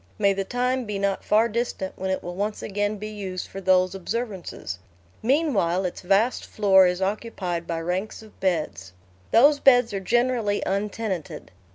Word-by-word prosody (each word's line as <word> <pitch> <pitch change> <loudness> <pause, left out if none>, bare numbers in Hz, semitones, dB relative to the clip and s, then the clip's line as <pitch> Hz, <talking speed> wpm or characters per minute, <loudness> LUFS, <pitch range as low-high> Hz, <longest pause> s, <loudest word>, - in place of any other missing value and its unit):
May 200 -1 +3
the 195 0 -2
time 250 +4 -1
be 210 -2 -3
not 195 -1 -1
far 220 +2 +3
distant 235 -4 -3
when 190 0 -4
it 190 - -1
will 175 - -5
once 205 +3 -3
again 205 +1 -1
be 210 +1 -6
used 195 -4 -5
for 195 - -8
those 185 -1 +3
observances! 195 - -5 0.4
Meanwhile 220 - +1
its 180 - -4
vast 200 +7 +2
floor 190 -3 +4
is 180 +1 -1
occupied 190 -4 -3
by 165 -1 -2
ranks 185 +6 -3
of 215 - -17
beds. 150 - -2 0.4
Those 285 +5 +5
beds 245 -5 +5
are 195 - -1
generally 235 0 +1
untenanted. 200 -2 -3
200 Hz, 165 wpm, -25 LUFS, 185-225 Hz, 0.4 s, Those